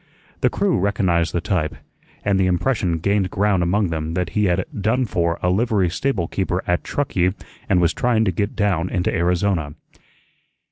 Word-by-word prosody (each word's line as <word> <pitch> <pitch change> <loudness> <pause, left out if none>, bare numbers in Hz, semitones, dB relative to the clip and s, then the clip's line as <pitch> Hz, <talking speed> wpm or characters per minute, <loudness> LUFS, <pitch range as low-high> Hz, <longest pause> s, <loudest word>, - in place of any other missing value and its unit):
The - - +3
crew - - +1
recognized 90 -4 +1
the 85 - -1
type, 80 -4 -1 0.5
and 100 -1 +2
the 95 - +3
impression 90 -1 0
gained 100 +3 +1
ground 100 -1 +1
among 95 +3 +1
them 80 0 -3
that 90 0 -1
he 105 -1 +1
had 90 -2 +1 0.2
"done 120 +5 +1
for" 85 -5 0
a 90 - +3
livery 100 -3 +1
stable 95 -4 -1
keeper 95 0 -2
at 90 0 0
Truckee 95 -10 0 0.3
and 95 - +4
was 85 -1 +2
trying 115 -3 +1
to 95 - +2
get 100 +4 -2
down 95 -5 0
into 90 -1 -1
Arizona. 85 -3 0
95 Hz, 175 wpm, -21 LUFS, 85-100 Hz, 0.5 s, and